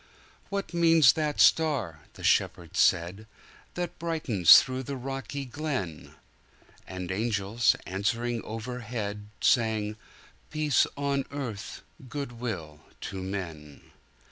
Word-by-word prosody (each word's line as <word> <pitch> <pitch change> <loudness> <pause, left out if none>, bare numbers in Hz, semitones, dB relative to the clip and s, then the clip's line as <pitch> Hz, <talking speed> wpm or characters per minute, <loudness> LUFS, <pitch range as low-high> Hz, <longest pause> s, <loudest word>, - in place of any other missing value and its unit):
""What 200 -2 -4
means 165 -5 +6
that 150 -2 -2
star," 135 - +3
the - - -12
Shepherds - - +1
said,"That 110 - -2
brightens 145 - +6
through 130 0 -3
the 135 +2 -5
rocky 135 +1 -5
glen?"And 95 - -7
angels, 110 +2 +1
answering 115 +5 -1
overhead, 110 -2 -5
Sang, 110 -3 +2 0.5
"Peace 155 -2 +2
on 140 -1 0
earth, 125 -8 -6 0.3
good 140 -1 -4
will 85 -11 -5 0.2
to 95 -1 -5
men!"' 85 -7 -7
120 Hz, 95 wpm, -28 LUFS, 100-140 Hz, 0.5 s, means